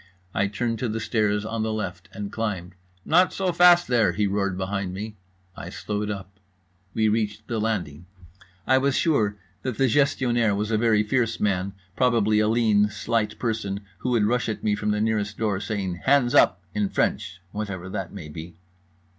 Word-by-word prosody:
I 100 - +1
turned 115 +3 -2
to 125 - -1
the 110 +1 -2
stairs 105 -2 0
on 115 0 -3
the 110 0 -1
left, 95 -4 -5
and 100 0 -6
climbed. 95 -6 -3 0.3
"Not 180 +3 +4
so 190 -2 0
fast 175 0 +6
there," 115 -7 +3
he 105 +3 +1
roared 100 -2 -1
behind 95 -1 -3
me. 105 +2 -6 0.4
I - - -7
slowed 105 0 -3
up. 95 -1 -7 0.6
We 110 -1 +3
reached 110 0 -1
the 115 -2 -2
landing. 90 -7 -3 0.6
I 130 0 +4
was 140 0 +1
sure 110 -11 +2 0.2
that 125 -4 -3
the 135 - +3
Gestionnaire 120 -5 +2
was 105 +2 -2
a - - +2
very 110 -2 +3
fierce 115 0 0
man—probably 100 +3 +1
a 105 - +3
lean 110 -2 +3
slight 105 +1 -1
person 105 -4 -2 0.2
who 125 - -2
would 115 -4 +3
rush 120 +1 +1
at 110 - -4
me 105 - +2
from 105 +1 -1
the 105 0 +1
nearest 105 -2 -1
door 105 -4 0
saying 100 -3 -3
"Hands 130 -3 +4
up" 90 0 +4
in 105 -2 0
French, 95 - -1
whatever 100 -4 -5
that 95 -2 -4
may 95 -6 -8
be. 80 +3 -9
105 Hz, 180 wpm, -25 LUFS, 100-115 Hz, 0.6 s, fast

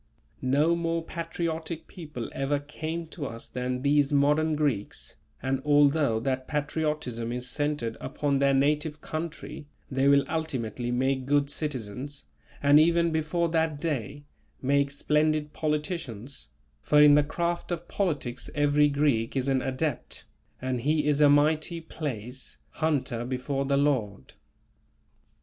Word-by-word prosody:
No 145 +6 +3
more 165 -1 -1
patriotic 165 -1 -4
people 150 -9 -7
ever 135 +2 0
came 155 +3 -5
to 150 -4 -5
us 115 +1 -8
than 125 0 -3
these 145 0 +3
modern 150 +2 +3
Greeks, 140 -9 -2 0.3
and 135 0 0
although 145 -4 +4
that 130 +2 -2
patriotism 150 -6 -2
is 125 +1 -4
centred 145 -4 -1
upon 140 0 -1
their 140 0 +3
native 150 +2 +1
country, 155 -2 -6 0.2
they 135 +1 +2
will 140 0 +5
ultimately 125 -7 -3
make 130 +1 0
good 145 0 +2
citizens, 140 -1 -4 0.4
and 145 +1 +7
even 170 +1 +4
before 160 +2 0
that 160 -2 0
day, 145 -2 -3 0.4
make 140 +1 +2
splendid 150 +1 +1
politicians; 150 - -3 0.3
for 150 - +4
in 150 0 +8
the 150 - +6
craft 170 +4 -2
of 175 0 -3
politics 145 -10 -2
every 145 0 +4
Greek 140 -6 +1
is 130 0 0
an 135 -1 +2
adept, 130 +1 -3 0.3
and 130 -1 -2
he 150 +3 +1
is 150 0 +2
a 145 - +7
"Mighty 155 +3 +3
(place) 130 -6 -6
hunter 140 -7 -1
before 130 +2 -2
the 140 0 +2
Lord." 120 - 0
145 Hz, 135 wpm, -27 LUFS, 130-155 Hz, 0.4 s, in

